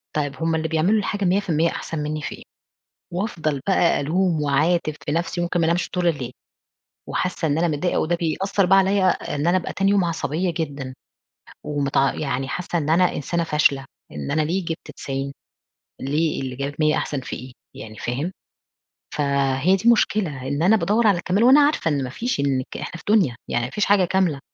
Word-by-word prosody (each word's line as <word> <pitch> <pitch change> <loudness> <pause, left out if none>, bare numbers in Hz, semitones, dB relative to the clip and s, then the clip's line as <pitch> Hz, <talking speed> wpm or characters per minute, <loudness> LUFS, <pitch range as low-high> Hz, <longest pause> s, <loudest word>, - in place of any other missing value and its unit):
طيب، 145 -2 -1
هم 165 0 +1
اللي 160 0 -1
بيعملوا 165 +7 +2
الحاجة 205 0 -2
100% 175 -3 +2
أحسن 160 - -5
منّي 150 +1 -3
في - - -5
إيه؟ - - -14 0.7
وافضل 165 -7 -2
بقى 185 -3 +3
ألوم 165 +2 +1
واعاتب 155 +3 +1
في - - -2
نفسي، 170 +2 -1
ممكن 175 0 -1
ما 165 - +2
أنامش 170 +2 0
طول 180 -1 0
الليل. 135 -7 -1 0.8
وحاسّة 180 -2 -1
إن 145 0 +1
أنا 170 +1 +2
متضايقة 165 +3 0
وده 175 +2 +1
بيأثّر 190 +4 0
بقى 195 +2 +5
عليّا 195 0 +3 0.3
إن 145 +3 -1
أنا 175 +2 +4
أبقى 180 - -4
تاني 195 0 +2
يوم 200 -2 +3
عصبية 170 +1 -1
جدًا. 140 -5 -4 0.7
ومتع 140 -2 +1
يعني 135 -2 -2
حاسّة 180 +1 -2
إن 155 -1 -2
أنا 180 +2 +3
إنسانة 170 +4 -1
فاشلة. 150 -3 +2 0.3
إن 75 -2 -5
أنا 155 - +2
ليه 175 +5 -1
جِبت 165 -1 -5
90؟ 135 0 -4 0.7
ليه 150 +4 0
اللي 130 -1 -4
جابت 140 +3 -5
100 155 -1 +3
أحسن 145 - -2
في - - -6
إيه؟ 130 +1 -9 0.2
يعني 110 -1 -9
فاهم؟ 135 - -3 0.8
فهي 140 +3 +2
دي 195 - -5
المشكلة، 195 - +2
إن 145 +3 -1
أنا 200 +5 +5
بادوّر 220 +2 +2
على 200 -4 +4
الكَمال 185 +5 +1
وأنا 265 +4 +7
عارفة 290 - +2
إن 140 -2 0
ما 130 - -4
فيش 235 - -2
إنِك 135 -2 -1
إحنا - - -5
في - - -14
دُنيا 190 - +3
يعني 120 0 0
ما - - -5
فيش 210 - 0
حاجة 200 -2 +4
كاملة. 180 -5 +1
160 Hz, 195 wpm, -22 LUFS, 140-185 Hz, 0.8 s, وأنا